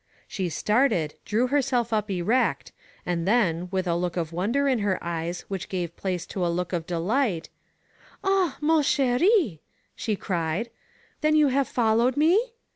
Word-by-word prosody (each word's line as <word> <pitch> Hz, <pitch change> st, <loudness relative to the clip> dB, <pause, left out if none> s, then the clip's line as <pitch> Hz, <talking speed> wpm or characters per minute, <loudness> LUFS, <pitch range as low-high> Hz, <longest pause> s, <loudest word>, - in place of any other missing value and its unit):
She 185 Hz, -3 st, -3 dB
started, 210 Hz, -, +1 dB
drew 225 Hz, +4 st, +1 dB
herself 255 Hz, -4 st, 0 dB
up 210 Hz, -1 st, 0 dB
erect, 200 Hz, +7 st, 0 dB, 0.3 s
and 175 Hz, 0 st, -1 dB
then, 180 Hz, -6 st, +2 dB
with 190 Hz, 0 st, -1 dB
a 170 Hz, -1 st, 0 dB
look 175 Hz, 0 st, -2 dB
of 165 Hz, -1 st, -2 dB
wonder 230 Hz, +11 st, 0 dB
in 260 Hz, -4 st, +2 dB
her 200 Hz, -2 st, 0 dB
eyes 170 Hz, +1 st, -4 dB
which 195 Hz, -3 st, -5 dB
gave 175 Hz, -3 st, -3 dB
place 185 Hz, -3 st, -3 dB
to 190 Hz, -, -4 dB
a 175 Hz, -, +1 dB
look 175 Hz, +2 st, -2 dB
of 165 Hz, -2 st, -2 dB
delight: 180 Hz, +2 st, 0 dB, 0.7 s
"Ah! 385 Hz, -6 st, +1 dB
man 315 Hz, +1 st, +3 dB
ck&i" 275 Hz, -, +2 dB, 0.4 s
she 215 Hz, -, -2 dB
cried. 180 Hz, +4 st, -2 dB, 0.5 s
Then 305 Hz, 0 st, +3 dB
you 300 Hz, -2 st, +5 dB
have 270 Hz, +1 st, +1 dB
followed 235 Hz, +2 st, +2 dB
me? 390 Hz, +11 st, +3 dB
210 Hz, 160 wpm, -25 LUFS, 175-270 Hz, 0.7 s, you